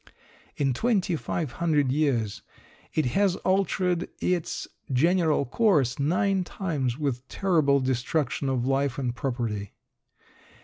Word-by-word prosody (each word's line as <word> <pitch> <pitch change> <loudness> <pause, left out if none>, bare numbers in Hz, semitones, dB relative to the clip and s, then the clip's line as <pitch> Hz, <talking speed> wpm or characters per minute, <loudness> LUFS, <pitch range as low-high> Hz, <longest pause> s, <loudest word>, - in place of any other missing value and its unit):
In 135 -3 +1
2500 165 - 0
years 130 -8 0 0.5
it 155 - 0
has 190 +8 +2
altered 185 -2 +1
its 180 -3 -1 0.2
general 160 +2 +3
course 145 - +2
nine 185 +6 +1
times 145 -10 -2
with 135 -4 -2
terrible 155 -8 +2
destruction 135 +2 -1
of 125 -2 0
life 135 0 0
and 125 -3 -1
property. 115 -7 -3
145 Hz, 100 wpm, -26 LUFS, 130-180 Hz, 0.5 s, general